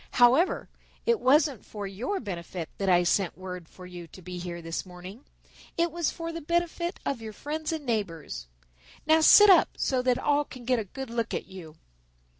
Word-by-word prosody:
However, 255 +9 +4 0.4
it 470 -2 +3
wasn't 280 -2 +3
for 205 -2 -7
your 225 - -3
benefit 175 -4 -6
that 195 -1 0
I 175 -1 +5
sent 180 +1 +1
word 180 -3 -8
for 185 - -13
you 175 -2 -9
to 185 - -14
be 180 +1 -6
here 175 -1 -5
this 165 0 -4
morning. 185 +6 -11 0.5
It 340 0 +2
was 340 -1 0
for 330 -1 -5
the 335 - -5
benefit 345 +2 -1
of 265 -5 -2
your 220 -1 -7
friends 305 +7 -4
and 315 -3 -4
neighbors. 175 - -3 0.6
Now 315 +1 +5
sit 415 +5 +9
up 370 - +6
so 260 -2 +1
that 250 -1 +2
all 290 0 +2
can 255 -4 -12
get 250 -1 +2
a 215 - -4
good 265 +5 -7
look 230 -1 -2
at - - -4
you." 170 -5 -11
235 Hz, 195 wpm, -27 LUFS, 180-305 Hz, 0.6 s, sit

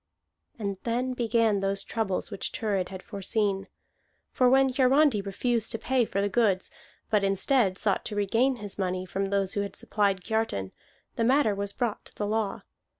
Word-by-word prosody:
And 200 -4 -3
then 245 +2 -1
began 230 -3 +2
those 195 0 -1
troubles 215 -5 -2
which - - -3
Thurid 200 -5 -1
had 190 -1 -8
foreseen. 200 -1 -1 0.6
For 250 -1 +4
when 270 +1 +5
Hiarandi 265 -2 +4
refused 225 +3 -1
to - - -1
pay 250 +1 +1
for 200 - -1
the 200 - +1
goods, 200 -3 +1 0.4
but 210 -2 +3
instead 195 +1 +2
sought 200 -2 +1
to 210 - -4
regain 230 +6 +2
his 205 -3 -6
money 185 -1 -1
from 195 +2 -2
those 195 -1 0
who 205 - 0
had 200 -1 -5
supplied 200 -3 0
Kiartan, 220 - -1 0.5
the 230 - +1
matter 250 -2 +4
was 200 0 -2
brought 235 -1 -2
to - - -13
the 205 - -2
law. 215 -1 -1
205 Hz, 175 wpm, -27 LUFS, 195-235 Hz, 0.6 s, when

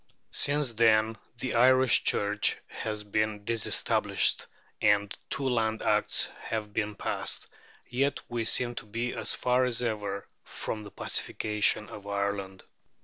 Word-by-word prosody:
Since 145 -3 0
then 110 -1 +3 0.2
the 125 +1 -3
Irish 130 +1 +5
Church 105 0 +2
has 105 -1 -5
been 105 0 -1
disestablished, 115 -1 +2 0.3
and 100 -1 +3
two 135 - -2
Land 110 -3 0
Acts - - +3
have 105 -2 -4
been 105 0 -1
passed; - - -2 0.4
yet 135 +3 0
we 120 -1 -2
seem 120 +1 +1
to 115 -2 -7
be 115 +3 -2
as - - 0
far 125 +1 +2
as 125 -1 0
ever 105 -3 -3 0.2
from 110 -1 -5
the 100 - -9
pacification 105 +1 -1
of 100 -1 -9
Ireland. 100 -1 -2
110 Hz, 135 wpm, -29 LUFS, 105-120 Hz, 0.4 s, Irish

